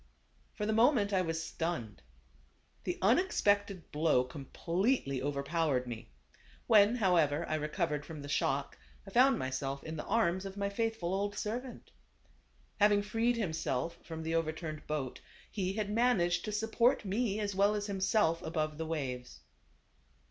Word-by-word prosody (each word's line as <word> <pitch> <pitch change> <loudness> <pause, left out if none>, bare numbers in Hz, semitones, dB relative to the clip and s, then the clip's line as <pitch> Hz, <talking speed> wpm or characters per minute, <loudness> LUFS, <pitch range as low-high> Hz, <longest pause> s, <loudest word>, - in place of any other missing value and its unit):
Bor 210 - -1
the 220 - +1
moment, 225 -3 +4
I 190 - +3
was 165 -2 -2
stunned. 160 - -4 0.8
The 180 - -2
unex 340 - +3
pected 200 -3 +2
blow 150 -4 +3
completely 145 - -1
overpowered 140 -1 0
me. 115 -1 -7 0.6
When 215 0 +6
however 170 -8 +2
I - - -2
recovered 150 0 -1
from 150 -1 -8
the - - -7
shock, 140 -1 -1 0.3
I 195 - -10
found 255 +3 +5
myself 135 0 -3
in 160 0 -6
the - - -5
arms 190 -5 +1
of 195 0 -7
my 200 0 -1
faithful 220 -4 -1
old 205 +1 -1
servant. 245 +4 -5 0.9
Having 205 0 +5
freed 225 +3 +1
himself 165 - -2
from 160 -1 -6
the 160 +1 -2
overturned 160 -1 -3
boat, 150 -4 -3 0.3
he 190 -2 -1
had 210 0 -2
managed 200 -7 +2
to 215 - -3
support 225 +4 +2
me 210 +1 0
as 205 -1 -2
well 200 +2 +3
as 205 -1 -2
him 195 -2 -4
self 190 -4 +2
above 155 -1 -2
the 160 - -3
waves. 125 - -4
180 Hz, 155 wpm, -32 LUFS, 155-210 Hz, 0.9 s, When